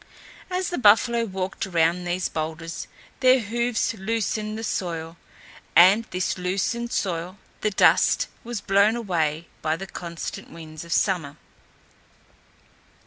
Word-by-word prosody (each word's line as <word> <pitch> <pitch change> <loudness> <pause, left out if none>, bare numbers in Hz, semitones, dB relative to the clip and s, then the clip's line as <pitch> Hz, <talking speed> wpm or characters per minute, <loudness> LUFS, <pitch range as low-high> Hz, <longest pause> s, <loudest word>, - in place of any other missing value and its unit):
As 365 0 -1
the 350 - -2
buffalo 230 +2 +5
walked 190 -1 -4
around 170 0 +1
these 175 +1 -1
boulders 160 +1 -5 0.3
their 255 0 +5
hoofs 235 +1 -1
loosened 215 0 -2
the 225 - -5
soil, 165 -5 -3 0.6
and 195 +6 +7
this 180 -2 -2
loosened 200 +6 -1
soil 180 0 -2 0.2
the 215 - +1
dust 200 - +4 0.2
was 235 -3 -5
blown 200 +3 +3
away 170 -8 -1 0.2
by 155 0 0
the 195 - -6
constant 170 -3 -7
winds 160 -1 -9
of 170 - -11
summer. 170 -9 0
190 Hz, 125 wpm, -24 LUFS, 170-225 Hz, 0.6 s, and